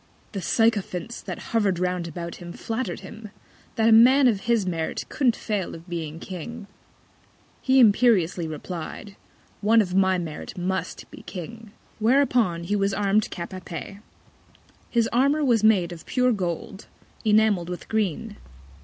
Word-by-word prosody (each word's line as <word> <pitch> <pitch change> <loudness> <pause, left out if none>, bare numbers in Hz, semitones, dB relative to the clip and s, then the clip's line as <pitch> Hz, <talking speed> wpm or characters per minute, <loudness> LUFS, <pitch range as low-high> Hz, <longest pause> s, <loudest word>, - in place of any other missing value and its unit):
The 195 - -4
Sycophants 215 0 0
that - - -8
hover'd 205 -5 +2
round 180 -1 -1
about 170 +1 -6
him 175 -1 -9
flatter'd 225 -6 -4
him, 215 +2 -10 0.5
that 225 0 +2
a - - +5
Man 255 +5 +7
of 220 -5 +2
his 230 -4 +3
Merit 165 -3 -3
couldn't 250 -6 +2
fail 205 -4 -3
of 165 +2 -13
being 165 -2 -5
King: 195 +6 -7 1.0
He 265 0 +4
imperiously 205 -7 +4
replied, 175 +5 -7 0.5
One 225 +3 +4
of 185 -4 0
my 190 0 +3
Merit 165 -1 -6
must 190 +1 -3
be - - -11
King: 215 +4 -9 0.3
Whereupon 230 -7 +2
he 200 +5 -1
was 195 -1 +1
arm'd 205 +1 +1
Cap 170 +1 -6
a 185 - -6
pee. 180 +4 -8 0.9
His 230 -2 +2
Armour 280 +5 +3
was 235 -5 +3
made 195 -6 +4
of 170 -2 -10
pure 250 -1 +2
Gold, 190 -1 -4 0.4
enamell'd 210 -5 +3
with 180 - -6
Green. 215 0 -2
200 Hz, 150 wpm, -25 LUFS, 175-225 Hz, 1.0 s, Man